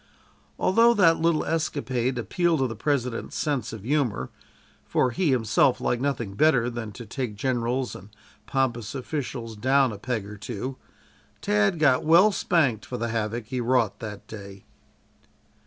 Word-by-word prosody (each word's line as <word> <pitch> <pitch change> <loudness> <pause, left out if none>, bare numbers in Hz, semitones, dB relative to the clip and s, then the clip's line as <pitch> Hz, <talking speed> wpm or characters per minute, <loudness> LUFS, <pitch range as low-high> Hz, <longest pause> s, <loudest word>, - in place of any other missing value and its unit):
Although 230 +5 +4
that 165 -5 +5
little 165 -1 +2
escapade 130 -6 -1
appealed 165 - +1
to - - +3
the 115 -2 -4
President's 125 -1 -2
sense 145 -4 -1
of 110 -3 -8
humor, 125 - -1 0.5
for 125 - +1
he 160 +7 0
himself 125 0 +3
liked 120 0 -1
nothing 125 -7 -2
better 125 0 +3
than 115 -2 -5
to 120 +3 -9
take 115 0 -4
generals 125 +2 -1
and 95 +3 -11 0.4
pompous 120 -3 -1
officials 125 -4 -4
down 130 +4 +3
"a 105 - -8
peg 115 -2 -3
or 105 +1 -9
two," 120 +5 -5 0.6
Tad 105 +7 +2
got 145 -5 +3
well 170 +7 +6
spanked 140 - +1
for 125 - -5
the 115 0 -2
havoc 110 0 -2
he 130 -1 -2
wrought 125 +2 +1
that 105 -3 -7
day. 100 -2 -10
125 Hz, 155 wpm, -25 LUFS, 110-140 Hz, 0.6 s, well